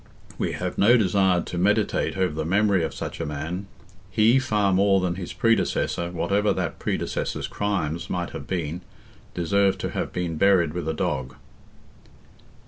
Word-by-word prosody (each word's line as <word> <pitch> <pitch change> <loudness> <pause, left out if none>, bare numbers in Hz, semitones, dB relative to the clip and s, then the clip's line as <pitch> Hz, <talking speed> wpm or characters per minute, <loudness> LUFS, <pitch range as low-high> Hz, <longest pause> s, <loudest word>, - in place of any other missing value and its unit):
We - - -1
have - - -4
no 120 +5 +6
desire 95 -3 +3
to 90 - -6
meditate 105 +1 +1
over 95 -4 +1
the 80 +1 -2
memory 100 +1 +2
of 80 - -2
such - - -6
a - - -2
man. 80 +7 -4 0.4
He, 110 +6 +4
far 105 -6 +1
more 95 +1 +4
than 90 -2 0
his 90 -1 -6
predecessor, 115 -6 +1
whatever 100 +4 +1
that 90 -4 -3
predecessor's - - -2
crimes 90 -6 -2
might 90 -1 -2
have 70 - -8
been, 85 -1 -3 0.5
deserved 95 +3 +2
to - - -3
have - - -3
been 85 -3 -3
buried 90 -4 +3
with 90 -2 -4
a 80 - -2
dog. 65 -4 -2
95 Hz, 160 wpm, -24 LUFS, 85-100 Hz, 0.5 s, no